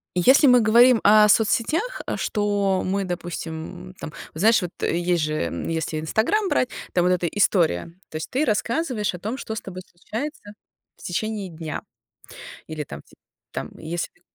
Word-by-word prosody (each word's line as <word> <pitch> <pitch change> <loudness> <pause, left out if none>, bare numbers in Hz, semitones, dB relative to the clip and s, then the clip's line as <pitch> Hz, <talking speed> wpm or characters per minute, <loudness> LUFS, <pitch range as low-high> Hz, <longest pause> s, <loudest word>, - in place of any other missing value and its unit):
Если 260 - +6
мы 250 -1 +7
говорим 235 +2 +6
о 210 +1 +7
соцсетях, 240 - +2
э, - - -1
что 205 -3 0
мы, 195 +1 -1
допустим, 165 - -6
м, - - -13
там, - - -8 0.2
вот 160 - -8
знаешь 225 +3 +5
вот, 180 -1 -4
есть 175 -1 +1
же, 155 0 -1 0.3
если 160 -1 -2
Instagram 245 - +1
брать, 250 - +1 0.2
там 175 - +3
вот 180 - +3
эта 180 -1 +1
история, 170 - +1 0.2
то - - -13
есть 155 - -4
ты 270 +4 +1
рассказываешь 230 - 0
о 180 - -7
том, 220 +7 -4
что 220 - -5
с - - -4
тобой 185 -1 -8
случается 215 - -7 0.4
в - - -17
течение 205 +1 -3
дня, 160 -1 -6 0.8
или 155 -1 -5
там 70 - -9
ти - - -22 0.4
там, - - -5
если 170 +2 -5
195 Hz, 170 wpm, -23 LUFS, 170-225 Hz, 0.8 s, мы